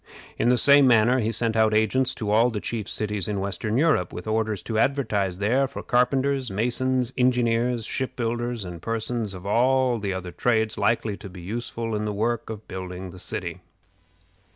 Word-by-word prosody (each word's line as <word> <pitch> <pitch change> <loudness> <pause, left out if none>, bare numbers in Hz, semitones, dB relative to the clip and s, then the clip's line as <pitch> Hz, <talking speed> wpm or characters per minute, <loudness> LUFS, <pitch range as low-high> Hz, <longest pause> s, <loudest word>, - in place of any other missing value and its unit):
In 120 - +3
the 125 - +4
same 140 +1 +6
manner 120 +2 +4
he 110 -1 0
sent 115 0 -1
out 110 -1 +3
agents 115 +4 +2
to 105 -2 -3
all 115 +3 +4
the 110 -3 -3
chief 110 -1 -4
cities 105 -3 -1
in 105 -2 -2
western 100 +3 -2
Europe, 145 - +2
with 90 - -7
orders 110 -2 -1
to 110 -2 -2
advertise 110 -9 0
there 120 +7 +2
for - - -8
carpenters, 130 +1 +1
masons, 125 +4 +1
engineers, 120 -2 +2
ship 130 +2 -3
builders, 120 -2 -2
and 85 -2 -8
persons 115 -2 -2
of 90 +1 -10
all 125 +3 +2
the 100 -2 -2
other 95 -1 -5
trades 110 +1 +1
likely 105 0 0
to 100 - -9
be 90 -1 -11
useful 115 +3 -4
in 105 0 -2
the 105 - -2
work 115 +3 -1
of 110 -1 -7
building 90 0 -6
the 90 - -12
city. - - -5
115 Hz, 185 wpm, -25 LUFS, 105-125 Hz, -, same